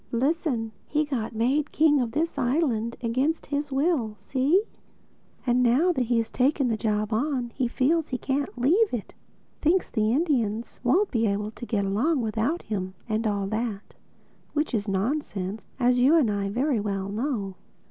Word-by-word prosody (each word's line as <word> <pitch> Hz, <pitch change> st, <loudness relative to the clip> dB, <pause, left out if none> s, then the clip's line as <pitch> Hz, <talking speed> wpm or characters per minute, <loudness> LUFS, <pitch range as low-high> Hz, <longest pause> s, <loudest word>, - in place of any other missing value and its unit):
Listen: 260 Hz, -3 st, 0 dB, 0.2 s
he 300 Hz, 0 st, +1 dB
got 235 Hz, -6 st, -3 dB
made 270 Hz, +7 st, +1 dB
king 300 Hz, -2 st, +4 dB
of 235 Hz, -2 st, -3 dB
this 325 Hz, +4 st, 0 dB
island 245 Hz, -4 st, 0 dB
against 260 Hz, +8 st, 0 dB
his 285 Hz, 0 st, -3 dB
will, 270 Hz, -6 st, +1 dB
see? 265 Hz, -, +1 dB, 0.8 s
And 250 Hz, 0 st, +3 dB
now 255 Hz, +9 st, +4 dB
that 260 Hz, -7 st, 0 dB
he 240 Hz, 0 st, +2 dB
has 230 Hz, -1 st, -1 dB
taken 270 Hz, 0 st, +2 dB
the 225 Hz, -, +1 dB
job 215 Hz, 0 st, -1 dB
on, 250 Hz, 0 st, -1 dB
he 255 Hz, -, 0 dB
feels 295 Hz, +7 st, +1 dB
that -, -, -23 dB
he 255 Hz, -, -1 dB
can't 275 Hz, +1 st, -2 dB
leave 365 Hz, -, +3 dB
it—thinks 310 Hz, -, -3 dB
the 215 Hz, -1 st, +1 dB
Indians 235 Hz, -7 st, 0 dB
won't 365 Hz, +12 st, +3 dB
be 230 Hz, -3 st, +2 dB
able 205 Hz, +1 st, -1 dB
to 240 Hz, +2 st, -9 dB
get 200 Hz, -4 st, 0 dB
along 255 Hz, +11 st, +1 dB
without 225 Hz, -, -1 dB
him 190 Hz, -3 st, -4 dB
and 220 Hz, 0 st, 0 dB
all 200 Hz, -2 st, 0 dB
that—which 220 Hz, +7 st, -5 dB
is 215 Hz, -2 st, -1 dB
nonsense, 200 Hz, -1 st, -2 dB
as 250 Hz, 0 st, +3 dB
you 270 Hz, +6 st, +5 dB
and 275 Hz, -10 st, +4 dB
I 200 Hz, -1 st, -1 dB
very 250 Hz, +3 st, +1 dB
well 195 Hz, -2 st, -2 dB
know. 210 Hz, -3 st, -2 dB
245 Hz, 170 wpm, -26 LUFS, 215-290 Hz, 0.8 s, you